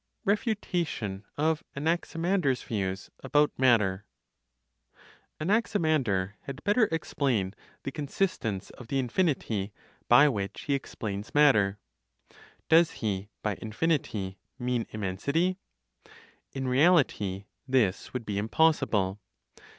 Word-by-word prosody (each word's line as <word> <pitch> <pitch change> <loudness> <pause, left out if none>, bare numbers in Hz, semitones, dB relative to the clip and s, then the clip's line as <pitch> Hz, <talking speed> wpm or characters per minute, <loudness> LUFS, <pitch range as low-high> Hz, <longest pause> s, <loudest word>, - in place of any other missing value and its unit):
REFUTATION 175 - -1
OF 155 +1 +1
ANAXIMANDER'S 165 -1 0
VIEWS 95 -3 -3
ABOUT 145 +3 +2
MATTER. 105 -7 +3 1.3
(Anaximander) 155 - +1
had 140 +1 -7
better 210 +3 +4
explain 130 -11 0 0.3
the 135 - -3
consistence 140 - -2
of 125 - -12
the 135 - -1
infinity 125 - 0 0.4
by 145 - +7
which 100 -8 -2
he 145 - -1
explains 105 -6 -4
matter. 105 -10 +5 0.9
Does 165 +1 +6 0.2
he, 100 -1 -2
by 105 -2 -1
infinity, 110 - -1 0.2
mean 125 -2 -1
immensity? 140 - -1 0.9
In 135 -1 -3
reality 125 - +3 0.2
this 120 -8 +1
would 125 -3 -4
be 100 -1 -2
impossible. 105 -6 +2
130 Hz, 95 wpm, -28 LUFS, 100-160 Hz, 1.3 s, by